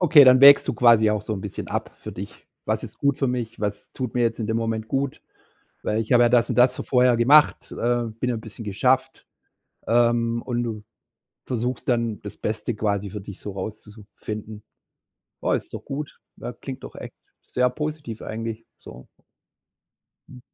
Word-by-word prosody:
Okay, 155 -5 +8
dann 130 0 +7
wägst 140 +1 +8
du - - 0
quasi 115 -3 +5
auch 105 -1 -1
so 110 - -4
'n 95 - -5
bisschen - - -6
ab - - -3
für - - -8
dich. - - -9 0.2
„Was - - -1
ist - - -11
gut 140 -1 +1
für 135 - +1
mich? 125 -4 -3
Was 105 -1 -4
tut 125 -3 -5
mir 125 - +1
jetzt 115 0 0
in 110 - -2
dem 110 +1 0
Moment 115 -1 -2
gut? 135 0 -2 0.6
Weil 110 +1 0
ich 110 +3 -2
habe 120 0 +6
ja - - +5
das 120 0 +3
und - - -1
das 125 +1 +5
so - - -5
vorher 125 -2 +3
gemacht, 145 +6 +4
äh, 120 0 0 0.2
bin 125 - 0
ja 120 - -1
bisschen 110 +1 -9
geschafft", 125 +6 0 0.6
ähm, 115 0 +2
und 120 -1 -2
du 110 -3 -5 0.6
versuchst 125 +1 -3
dann, 115 -3 0
das 105 - -9
Beste 110 +1 -3
quasi 100 -2 -1
für 105 +2 -7
dich 100 -1 -10
so 105 - -6
rauszu 105 +3 -7
zu 105 -1 -15
finden. 105 0 -7 0.8
Ja, - - +2
ist - - -4
doch - - -7
gut. 140 +1 -6 0.2
Na, 120 - -6
klingt 130 +2 -8
doch - - -9
echt - - -9 0.3
sehr 125 0 0
positiv 150 -4 -5
eigentlich, 115 0 -5
so. 65 - -13 1.2
Mhm. 125 - -13
115 Hz, 195 wpm, -24 LUFS, 110-125 Hz, 1.2 s, Okay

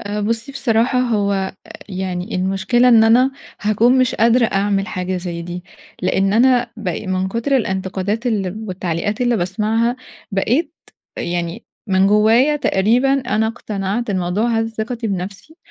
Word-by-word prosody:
آآ، 205 +1 -4
بُصي 230 +5 -2
بصراحة، 240 0 +1
هو 210 -5 +1
آآ، 190 -1 -2 0.3
يعني 185 +1 -4
المشكلة 195 +7 +2
إن 225 -2 +6
أنا 250 +4 +5 0.3
هاكون 225 +5 +3
مش 255 -2 +2
قادرة 235 +1 +4
أعمل 195 0 0
حاجة 185 -1 -3
زي 175 -2 -5
دي، 175 +1 -7 0.4
لأن 195 0 +1
أنا 245 +2 +3
ب 215 -4 -4
من 185 0 -2
كتر 235 +6 0
الانتقادات 190 +1 -2
ال 210 -2 -2
والتعليقات 185 +3 -3
اللي 240 -2 +2
باسمعها 220 +6 0 0.4
بقيت 265 - 0 0.4
يعني 175 +4 -3 0.2
من 190 0 +3
جوايا 225 +8 +4
تقريبًا 245 +3 +2
أنا 220 -3 0
اقتنعت، 215 -1 -3
الموضوع 185 +5 0
هز 225 0 -2
ثقتي 230 +1 -3
بنفسي 200 - -5
210 Hz, 140 wpm, -19 LUFS, 190-235 Hz, 0.4 s, إن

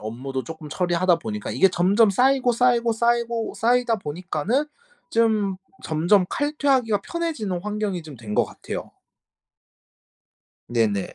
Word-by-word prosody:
업무도 130 +5 -5
조금 160 -2 -9
처리하다 175 +2 +2
보니까 210 +2 -5
이게 195 - +4
점점 200 +5 +3
쌓이고, 255 +3 +3
쌓이고, 235 -1 +2
쌓이고, 235 0 0
쌓이다 240 0 +2
보니까는 185 - -2 0.4
좀 215 -4 +2 0.3
점점 175 +5 +3
칼퇴 290 0 -2
하기가 225 -6 +3
편해지는 295 - -3
환경이 210 -4 -3
좀 150 -4 -11
된 105 -3 -6
것 - - +3
같아요. - - -7 1.8
네네. 110 -5 0
205 Hz, 295 characters per minute, -23 LUFS, 165-235 Hz, 1.8 s, 이게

